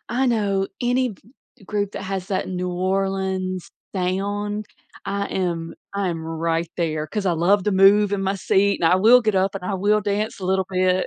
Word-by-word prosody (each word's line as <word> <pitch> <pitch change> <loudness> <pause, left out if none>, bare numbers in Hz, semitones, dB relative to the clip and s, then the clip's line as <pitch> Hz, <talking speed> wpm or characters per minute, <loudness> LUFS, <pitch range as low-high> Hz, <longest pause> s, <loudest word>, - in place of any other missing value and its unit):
I 255 +3 +1
know 200 -5 +1 0.2
any 245 0 +1
v 195 - -14 0.4
group 205 -1 -2
that - - -6
has 190 -1 -3
that 190 - -1
New 180 -1 -3
Orleans 190 0 -1 0.2
sound, 205 +3 -2 0.4
I 200 0 -1
am 170 -3 -2 0.2
I 200 -1 0
am 165 -2 -4
right 165 0 -1
there 155 -3 -1
'cause 200 +5 -3
I 180 - +3
love 180 +4 +2
to 210 - +1
move 200 +2 +5
in 195 -1 0
my 195 +1 0
seat, 200 +2 +2
and 165 - +5
I - - +5
will 230 +6 +6
get 215 -2 +1
up 190 +1 +1
and 190 - -5
I 195 +1 -2
will 205 +3 +2
dance 205 +1 -2
a 185 - -4
little 190 0 +1
bit. 185 0 +2
195 Hz, 200 wpm, -22 LUFS, 185-205 Hz, 0.4 s, will